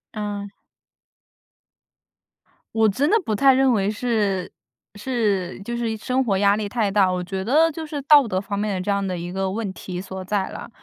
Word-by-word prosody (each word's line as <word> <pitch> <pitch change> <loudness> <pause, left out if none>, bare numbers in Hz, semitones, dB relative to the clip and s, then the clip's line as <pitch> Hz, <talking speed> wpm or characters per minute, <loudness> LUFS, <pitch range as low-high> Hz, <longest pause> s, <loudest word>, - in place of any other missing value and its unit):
嗯。 205 -1 -4 2.3
我 220 -1 +4
真 280 - +1
的 435 - +4
不 220 - -1
太 270 +5 +5
认 265 0 +3
为 200 -3 +1
是 210 -5 -1 0.4
是 205 -6 -1
就 235 +4 -4
是 235 -1 -1
一 220 - -2
生 255 +4 -1
活 195 -4 +1
压 200 +1 +3
力 210 -1 -2
太 210 -2 -1
大， 195 -2 +4
我 180 -1 -2
觉 190 +1 -4
得 310 +10 +3
就 320 +1 -6
是 295 -2 -5
道 285 -3 +6
德 185 -2 -1
方 200 0 -4
面 210 -1 -1
的 185 - -2
这 200 - -1
样 200 0 0
的 180 -2 -3
一 175 +1 -5
个 190 0 -1
问 205 -1 -3
题 180 -1 -6
所 190 -1 -7
在 195 0 -1
啦。 - - -8
205 Hz, 215 characters per minute, -22 LUFS, 195-240 Hz, 2.3 s, 道